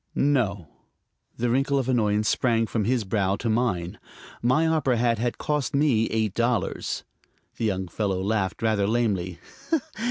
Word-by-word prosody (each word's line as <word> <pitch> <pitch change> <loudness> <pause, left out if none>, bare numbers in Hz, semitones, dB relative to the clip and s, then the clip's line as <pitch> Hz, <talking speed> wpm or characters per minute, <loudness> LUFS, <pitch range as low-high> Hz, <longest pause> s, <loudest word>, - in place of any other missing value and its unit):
"No." 110 - +1 0.7
The 120 0 0
wrinkle 135 +2 +2
of 130 -2 0
annoyance 105 -4 +2
sprang 115 0 +2
from 110 -1 -1
his 120 0 +1
brow 95 -1 0
to 115 - -4
mine. 110 -7 -1 0.4
My 130 +7 +3
opera 155 -6 +2
hat 115 -1 +1
had 120 +1 -1
cost 150 -3 -1
me 135 -6 +3
eight 110 -3 0
dollars. 120 -4 -1 0.5
The 115 - -1
young 95 -3 -1
fellow 95 +1 -1
laughed 100 0 -1
rather 105 -3 +2
lamely. 100 -6 0
115 Hz, 150 wpm, -25 LUFS, 100-125 Hz, 0.7 s, My